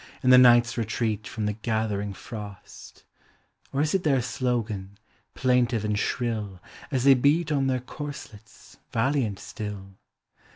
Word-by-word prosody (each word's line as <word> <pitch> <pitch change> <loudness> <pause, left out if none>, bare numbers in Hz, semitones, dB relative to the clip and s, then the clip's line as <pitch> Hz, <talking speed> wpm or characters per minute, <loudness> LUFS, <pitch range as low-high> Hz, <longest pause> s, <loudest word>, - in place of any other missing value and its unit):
In 130 - +5
the 125 - +9
night's 120 -1 +5
retreat 110 -1 -2
from 110 -2 -4
the 105 - 0
gathering 110 -2 -2
frost; 100 0 -10 0.7
(Or 140 - 0
is 150 0 0
it 190 -2 +1
their 140 -4 +3
slogan, 115 -5 -2 0.4
plaintive 120 -4 +1
and 105 -1 0
shrill. 110 -7 -2 0.3
As 130 -4 -1
they 140 0 +8
beat 150 +5 +2
on 135 -2 +1
their 130 -1 0
corselets, 140 -5 -10
valiant 120 -4 0
still?) 100 -2 -8
120 Hz, 135 wpm, -26 LUFS, 105-130 Hz, 0.7 s, the